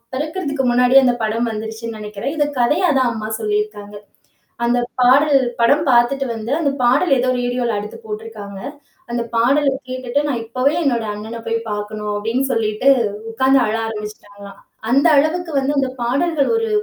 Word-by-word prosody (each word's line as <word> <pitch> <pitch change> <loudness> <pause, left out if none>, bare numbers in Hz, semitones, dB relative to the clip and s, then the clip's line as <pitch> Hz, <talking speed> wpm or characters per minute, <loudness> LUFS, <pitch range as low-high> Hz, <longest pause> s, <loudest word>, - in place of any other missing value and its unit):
பிறக்கிறதற்கு 295 -2 -2
முன்னாடியே, 250 +2 +5
அந்த 245 -1 +3
படம் 230 +2 -1
வந்துருச்சுன்னு 220 +1 -6
நினைக்கிறேன். 210 +6 -5
இதை 295 -1 +2
கதையா 315 +10 +2
தான் 250 -2 +2
அம்மா 215 -1 -5
சொல்லியிருக்காங்க. 210 -1 -3 0.7
அந்த 240 +1 +2 0.2
பாடல் 275 +3 +5 0.2
படம் 285 +7 +3
பார்த்துவிட்டு 250 +3 +3
வந்து 225 +2 -5
அந்த 290 -4 +1
பாடல் 265 +8 +3
ஏதோ 255 +1 +1
ரேடியோல 245 -1 -1
அடுத்து 210 +2 -6
போட்டிருக்காங்க. 210 -2 -7 0.5
அந்த 240 0 -1
பாடல 270 +6 +3 0.2
கேட்டுட்டு 255 +1 -2
நான் 250 -5 -2
இப்பவே 255 +5 0
என்னோட 240 -6 0
அண்ணன 220 +3 -7
போய் 230 - 0
பாக்கண்ணும் 210 0 -4
அப்பிடின்னு 225 +6 -1
சொல்லிட்டு 225 +2 +1 0.4
உட்கார்ந்து 265 +4 +3
அழ 215 - -1
ஆரம்பிச்சுட்டாங்களாம். 205 -2 -9 0.3
அந்த 275 +6 +4
அளவுக்கு 325 +4 +1
வந்து 275 +1 +1
அந்த 270 -1 +1
பாடல்கள் 280 +5 +1
ஒரு 455 0 -1
240 Hz, 150 wpm, -19 LUFS, 215-275 Hz, 0.7 s, முன்னாடியே